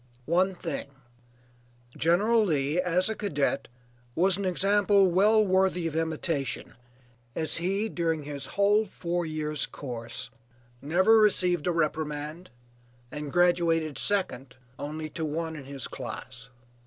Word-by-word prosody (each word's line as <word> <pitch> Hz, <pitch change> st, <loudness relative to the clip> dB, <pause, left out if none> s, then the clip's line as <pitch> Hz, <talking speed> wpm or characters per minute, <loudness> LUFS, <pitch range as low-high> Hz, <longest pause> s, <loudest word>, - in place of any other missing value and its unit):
One 185 Hz, +5 st, +2 dB
thing, 165 Hz, -6 st, -4 dB, 1.1 s
General 210 Hz, +8 st, +3 dB
Lee, 155 Hz, -2 st, +1 dB
as 180 Hz, 0 st, +1 dB
a 220 Hz, -, 0 dB
cadet, 145 Hz, -9 st, -1 dB, 0.5 s
was 185 Hz, +2 st, +3 dB
an 200 Hz, +1 st, -3 dB
example 200 Hz, +2 st, +3 dB
well 210 Hz, +4 st, +4 dB
worthy 185 Hz, -2 st, +2 dB
of 160 Hz, -2 st, -3 dB
imitation, 160 Hz, -3 st, -2 dB, 0.6 s
as 160 Hz, -1 st, -2 dB
he, 195 Hz, +5 st, 0 dB
during 165 Hz, -6 st, -1 dB
his 145 Hz, -1 st, -7 dB
whole 205 Hz, +2 st, +4 dB
four 175 Hz, -2 st, -3 dB
years' 155 Hz, -2 st, -2 dB
course, 120 Hz, -4 st, -7 dB, 0.5 s
never 185 Hz, +9 st, +4 dB
received 180 Hz, -6 st, +2 dB
a -, -, +3 dB
reprimand, 155 Hz, +1 st, -2 dB, 0.6 s
and 150 Hz, -1 st, -5 dB
graduated 170 Hz, -3 st, +2 dB
second 140 Hz, -11 st, 0 dB, 0.2 s
only 155 Hz, +2 st, -4 dB
to 160 Hz, -, -4 dB
one 160 Hz, +1 st, -3 dB
in 145 Hz, -3 st, -9 dB
his 135 Hz, -2 st, -4 dB
class. 125 Hz, -1 st, -7 dB
165 Hz, 125 wpm, -28 LUFS, 150-190 Hz, 1.1 s, well